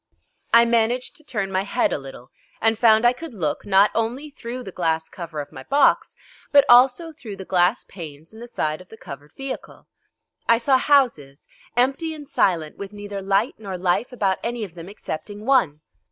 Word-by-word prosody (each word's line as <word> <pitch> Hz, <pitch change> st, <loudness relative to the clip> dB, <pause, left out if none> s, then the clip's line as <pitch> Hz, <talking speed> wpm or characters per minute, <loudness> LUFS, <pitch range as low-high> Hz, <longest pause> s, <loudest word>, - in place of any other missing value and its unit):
I 235 Hz, 0 st, +7 dB
managed 235 Hz, +5 st, +1 dB
to 310 Hz, -, -16 dB
turn 200 Hz, -8 st, -3 dB
my 190 Hz, 0 st, +1 dB
head 200 Hz, -, 0 dB
a -, -, -2 dB
little, 135 Hz, -2 st, -12 dB, 0.3 s
and 225 Hz, 0 st, +2 dB
found 220 Hz, -1 st, +5 dB
I 240 Hz, -, +6 dB
could 265 Hz, -1 st, -9 dB
look, 155 Hz, -4 st, -3 dB
not 195 Hz, +1 st, +5 dB
only 245 Hz, +7 st, -2 dB
through 250 Hz, -1 st, -7 dB
the 190 Hz, -, -8 dB
glass 160 Hz, -2 st, -1 dB
cover 165 Hz, -4 st, -7 dB
of 145 Hz, -, -10 dB
my 130 Hz, -, -9 dB
box, 280 Hz, -, +2 dB, 0.4 s
but 285 Hz, -1 st, +7 dB
also 255 Hz, +7 st, +5 dB
through 240 Hz, -10 st, -9 dB
the 190 Hz, -, -9 dB
glass 180 Hz, +5 st, +2 dB
panes 160 Hz, -2 st, -10 dB
in 220 Hz, -, -12 dB
the 240 Hz, -, -9 dB
side 155 Hz, -8 st, -2 dB
of 185 Hz, -, -17 dB
the 220 Hz, -, -13 dB
covered 145 Hz, -5 st, -11 dB
vehicle. 270 Hz, -1 st, -7 dB, 0.6 s
I 230 Hz, -, +6 dB
saw 260 Hz, +2 st, +3 dB
houses, 235 Hz, -, +1 dB, 0.3 s
empty 275 Hz, +6 st, +1 dB
and 295 Hz, -2 st, -11 dB
silent, 165 Hz, -10 st, 0 dB
with 200 Hz, 0 st, -8 dB
neither 205 Hz, -1 st, -6 dB
light 195 Hz, +5 st, +1 dB
nor 195 Hz, -4 st, -5 dB
life 180 Hz, +7 st, 0 dB
about 195 Hz, -6 st, 0 dB
any 235 Hz, -1 st, -3 dB
of 190 Hz, -5 st, -7 dB
them 170 Hz, +1 st, -10 dB
excepting 205 Hz, +2 st, -7 dB
one. 190 Hz, -, +2 dB
210 Hz, 195 wpm, -23 LUFS, 175-245 Hz, 0.6 s, I